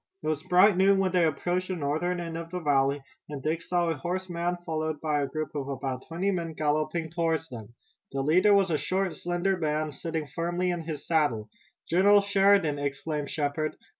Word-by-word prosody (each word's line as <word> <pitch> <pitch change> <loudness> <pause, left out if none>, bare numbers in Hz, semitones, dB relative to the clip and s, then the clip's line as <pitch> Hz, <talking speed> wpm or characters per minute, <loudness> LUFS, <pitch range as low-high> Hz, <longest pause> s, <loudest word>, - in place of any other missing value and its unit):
It - - -3
was 155 -1 -1
bright 180 +3 +5
noon 195 +1 +5
when 190 -1 +1
they 180 -2 +3
approached 175 +4 -1
the 185 - -2
northern 165 +4 -1
end 165 -1 -5
of 165 0 -6
the 180 +1 -4
valley, 140 -3 +1 0.3
and 145 -3 -6
Dick 160 +2 -1
saw 175 -1 0
a - - -1
horseman 175 +2 -2
followed 155 -2 -2
by 150 -2 0
a 140 - -1
group 155 +1 -4
of 140 -2 -3
about 130 -1 -4
twenty 175 +5 -1
men 170 -3 -3
galloping 155 +2 -1
toward 165 -1 0
them. 115 -1 -9 0.4
The 135 - -2
leader 185 +8 +5
was 195 -3 +3
a 155 - +1
short, 190 0 -1
slender 175 +2 -1
man, 155 -1 -1
sitting 160 +2 -4
firmly 175 +5 -1
in 175 -1 -3
his 155 -3 -5
saddle. 145 -10 +1 0.4
"General 200 +4 +5
Sheridan!" 195 -6 +3
exclaimed 145 +1 -3
Shepard. 150 +1 -2
165 Hz, 195 wpm, -28 LUFS, 150-180 Hz, 0.4 s, bright